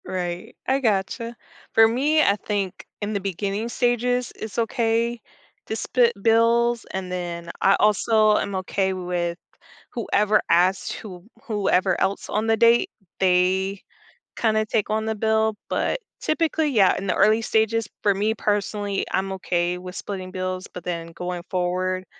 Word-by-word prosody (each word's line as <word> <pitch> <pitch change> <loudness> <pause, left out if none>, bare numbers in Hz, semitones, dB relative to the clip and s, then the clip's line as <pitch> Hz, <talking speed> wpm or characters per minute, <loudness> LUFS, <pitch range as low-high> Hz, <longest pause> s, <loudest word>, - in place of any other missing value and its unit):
Right, 175 -1 -4
I 265 +1 +2
gotcha. 230 +1 -1 0.4
For 225 0 +7
me, 285 +7 +2
I 200 - +4
think 200 -2 -3 0.2
in 205 +1 -2
the 200 - 0
beginning 200 +3 -3
stages, 245 0 0
it's 220 -2 -7
okay 230 0 0 0.5
to 220 - -2
split 240 +1 +2
bills 230 +1 +3
and 190 -1 -4
then, 170 -2 -4
I 195 - +5
also 215 0 +4
am 200 - -2
okay 190 +1 -1
with 175 -2 -2 0.5
whoever 210 -2 +2
asked 180 +3 +2
whom 185 -1 -10
whoever 195 -4 +1
else 195 - -1
on 215 +2 -1
the 225 0 +3
date, 235 - +4 0.3
they 190 +1 +2 0.5
kinda 215 -1 +1
take 215 -1 0
on 220 0 0
the 220 0 -1
bill, 220 0 +1
but - - -1 0.2
typically, 315 -1 +1
yeah, 210 -8 +4
in 195 - -4
the - - +1
early 215 +2 +4
stages, 220 0 +1 0.2
for 205 - +4
me 210 +3 0
personally, 205 -1 -1
I'm 195 +1 -1
okay 180 -2 -1
with 180 0 -9
splitting 185 -2 -6
bills, 185 0 -4
but 180 - -8
then 170 -2 -4
going 180 +1 -5
forward, 185 +1 -1
205 Hz, 150 wpm, -23 LUFS, 185-225 Hz, 0.5 s, For